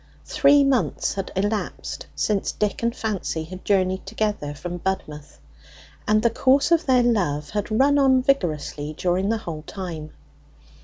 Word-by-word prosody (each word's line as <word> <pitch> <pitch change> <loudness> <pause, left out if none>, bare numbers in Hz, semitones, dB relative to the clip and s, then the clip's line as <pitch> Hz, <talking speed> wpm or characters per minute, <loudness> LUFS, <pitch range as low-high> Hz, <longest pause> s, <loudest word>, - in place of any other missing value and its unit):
Three 290 -1 +4
months 275 -3 +1
had 195 -1 -5
elapsed 205 +2 -3
since 205 -2 0
Dick 210 -1 -2
and 235 +1 0
Fancy 200 -8 -3
had 185 +3 -10
journeyed 190 -2 +1
together 205 -8 -2
from 175 +4 -6
Budmouth, 155 -6 -4 0.7
and 215 +1 +3
the 235 - +3
course 270 +7 +3
of 335 -2 +3
their 255 -2 +4
love 175 -11 0
had 205 +1 -2
run 275 +6 +3
on 260 -2 +4
vigorously 155 - -1
during 185 +2 0
the 225 - +1
whole 165 -7 -6
time. 170 -6 -6
205 Hz, 150 wpm, -23 LUFS, 175-240 Hz, 0.7 s, Three